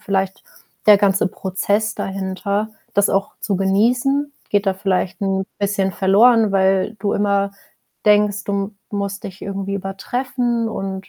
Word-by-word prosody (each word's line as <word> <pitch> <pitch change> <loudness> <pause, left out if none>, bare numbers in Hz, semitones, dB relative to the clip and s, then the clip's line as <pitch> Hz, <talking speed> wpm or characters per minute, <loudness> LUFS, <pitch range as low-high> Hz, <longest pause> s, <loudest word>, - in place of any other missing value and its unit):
vielleicht 195 -1 -2 0.4
der 210 -1 +9
ganze 195 -1 +2
Prozess 200 +4 -1
dahinter, 195 +2 -2 0.3
das 200 0 +3
auch 195 +1 0
zu 200 - -1
genießen, 245 +9 +1 0.2
geht 205 0 +1
da 195 - +3
vielleicht 190 -1 -1
'n 195 -1 0
bisschen 200 -1 0
verloren, 215 +3 +4
weil 190 +2 +2
du 200 0 0
immer 200 -1 +1 0.6
denkst, 210 0 +3
du 200 0 -2 0.2
musst 200 -1 -4
dich 195 0 -8
irgendwie 195 0 -4
übertreffen 235 +4 -2
und 195 -2 -5
200 Hz, 135 wpm, -20 LUFS, 195-210 Hz, 0.6 s, der